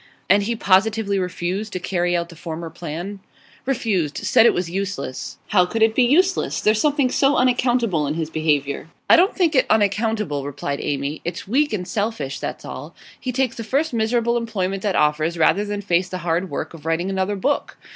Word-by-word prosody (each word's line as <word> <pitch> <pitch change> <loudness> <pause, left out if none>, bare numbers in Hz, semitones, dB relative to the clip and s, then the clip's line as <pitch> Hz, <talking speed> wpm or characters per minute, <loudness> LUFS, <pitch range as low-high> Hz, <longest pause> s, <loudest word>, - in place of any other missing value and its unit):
'And 200 +1 +5
he 230 +4 -1
positively 200 0 +2
refused 185 +3 -3
to 185 - -2
carry 175 -1 0
out 170 0 -3
the 170 - -12
former 160 +1 -6
plan?' 175 +4 -6 0.5
'Refused. 200 - 0
Said 215 +2 +4
it - - +4
was 180 -1 -1
useless.' 170 -9 -4
'How 180 -4 +4
could 225 +4 +1
it 220 0 +4
be 255 - +3
useless? 360 +10 +2
There's 215 0 +2
something 285 -4 +2
so 275 +2 +3
unaccountable 240 - +2
in 150 - -2
his 160 -1 -3
behaviour.' 150 -2 0 0.2
'I - - +10
don't 370 +4 +4
think 345 -4 +2
it 260 - +3
unaccountable,' 210 -7 +1
replied 140 0 -4
Amy. 140 +1 -3
'It's 170 +1 -5
weak 285 +8 +2
and 185 -4 -3
selfish, 205 - -2
that's - - -5
all. - - -8 0.2
He 255 - -3
takes 255 -1 -1
the 230 - -4
first 280 +6 0
miserable 235 +1 +1
employment 195 -5 -2
that 200 -2 -1
offers 155 +3 +1
rather 175 +5 +3
than 205 0 -4
face 180 -2 +1
the 185 - -4
hard 175 +2 0
work 145 - -4
of 160 -3 -12
writing 170 +4 0
another 190 +1 -1
book. 275 +9 -1
195 Hz, 195 wpm, -21 LUFS, 165-230 Hz, 0.5 s, I